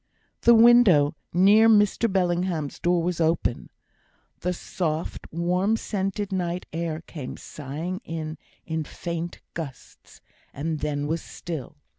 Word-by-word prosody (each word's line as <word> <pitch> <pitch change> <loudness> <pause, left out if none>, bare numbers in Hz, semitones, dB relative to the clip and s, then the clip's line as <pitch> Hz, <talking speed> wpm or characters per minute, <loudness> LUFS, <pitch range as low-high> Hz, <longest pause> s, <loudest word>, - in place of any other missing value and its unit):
The 235 - +7
window 225 -11 +6 0.2
near 205 +5 +6
Mr 210 +1 +4
Bellingham's 175 -5 0
door 175 -1 +2
was 175 -1 -1
open; 160 -6 0 0.7
the 180 - -1
soft, 165 -2 -3
warm 180 +6 +1
scented 200 -1 -3
night 180 -1 -2
air 165 -1 -3
came 150 -6 -8
sighing 155 - -6
in 160 -1 -5 0.3
in 160 -1 -2
faint 170 +2 -5
gusts, 145 -7 -9 0.4
and 155 +2 -2
then 145 -1 -2
was 160 +2 -1
still. 160 -2 -7
170 Hz, 120 wpm, -25 LUFS, 155-190 Hz, 0.7 s, The